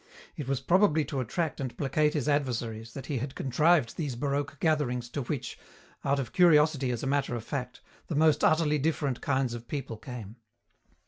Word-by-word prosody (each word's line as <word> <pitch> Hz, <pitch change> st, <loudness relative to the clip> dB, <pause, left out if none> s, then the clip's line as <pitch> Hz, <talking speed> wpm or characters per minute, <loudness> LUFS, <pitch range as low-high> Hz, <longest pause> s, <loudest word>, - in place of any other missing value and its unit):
It 145 Hz, -5 st, -5 dB
was 135 Hz, -2 st, -1 dB
probably 175 Hz, -5 st, +3 dB
to 140 Hz, -, -3 dB
attract 155 Hz, +6 st, -2 dB
and 130 Hz, -3 st, -5 dB
placate 150 Hz, +2 st, +1 dB
his 145 Hz, -2 st, -1 dB
adversaries 115 Hz, -6 st, -1 dB
that 135 Hz, -, -6 dB
he 135 Hz, -2 st, -2 dB
had 130 Hz, +3 st, -5 dB
contrived 145 Hz, -1 st, +2 dB
these 145 Hz, -7 st, -2 dB
baroque 140 Hz, +2 st, -2 dB
gatherings 130 Hz, -7 st, 0 dB
to 140 Hz, -, -3 dB
which, 135 Hz, +1 st, -4 dB, 0.4 s
out 140 Hz, +1 st, +2 dB
of 135 Hz, -3 st, -4 dB
curiosity 155 Hz, -6 st, +4 dB
as 120 Hz, -2 st, -2 dB
a -, -, -1 dB
matter 135 Hz, -2 st, 0 dB
of 115 Hz, -, -5 dB
fact, 125 Hz, -1 st, -5 dB, 0.3 s
the 160 Hz, -, -3 dB
most 155 Hz, 0 st, +4 dB
utterly 155 Hz, -2 st, +3 dB
different 145 Hz, -3 st, -1 dB
kinds 130 Hz, -3 st, 0 dB
of 120 Hz, 0 st, -7 dB
people 135 Hz, -6 st, -4 dB
came. 115 Hz, -2 st, -8 dB
140 Hz, 185 wpm, -29 LUFS, 125-150 Hz, 0.4 s, curiosity